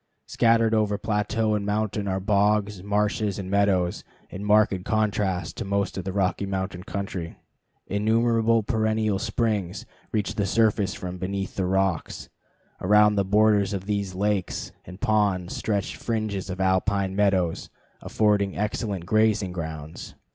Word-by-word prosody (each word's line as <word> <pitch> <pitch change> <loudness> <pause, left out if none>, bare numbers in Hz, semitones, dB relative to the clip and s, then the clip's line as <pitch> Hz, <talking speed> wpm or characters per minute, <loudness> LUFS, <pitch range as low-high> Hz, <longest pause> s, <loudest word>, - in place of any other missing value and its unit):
Scattered 115 -1 +3
over 105 -2 +1
plateau 110 +1 0
and 105 -1 -1
mountain 105 0 -1
are 95 0 -1
bogs, 105 0 +1
marshes, 105 0 0
and 95 -1 -5
meadows 95 -3 +1 0.3
in 100 - -6
marked 105 -3 +3
contrast 105 -4 -1
to - - -3
most 100 0 -1
of 95 - -5
the 95 - -2
Rocky 100 0 0
Mountain 95 -1 -4
country. 95 -5 -5 0.5
Innumerable 115 +2 +2
perennial 110 -2 0
springs 105 -4 -1 0.3
reach 105 -2 -1
the 100 -2 -1
surface 105 -2 +2
from 90 0 -6
beneath 95 +1 -3
the 95 -2 -1
rocks. 95 -3 -1 0.5
Around 105 +2 +5
the 100 -1 +1
borders 105 0 +3
of 95 -1 -4
these 100 -2 -2
lakes 100 -1 -1
and 90 +2 -11
ponds 100 -4 +1
stretch 100 -2 -2
fringes 110 -5 -3
of 95 0 -5
alpine 95 +1 +1
meadows, 95 -4 +1 0.3
affording 105 -3 +1
excellent 105 -3 -2
grazing 110 -1 +2
grounds. 80 -3 -7
100 Hz, 140 wpm, -25 LUFS, 95-105 Hz, 0.5 s, Around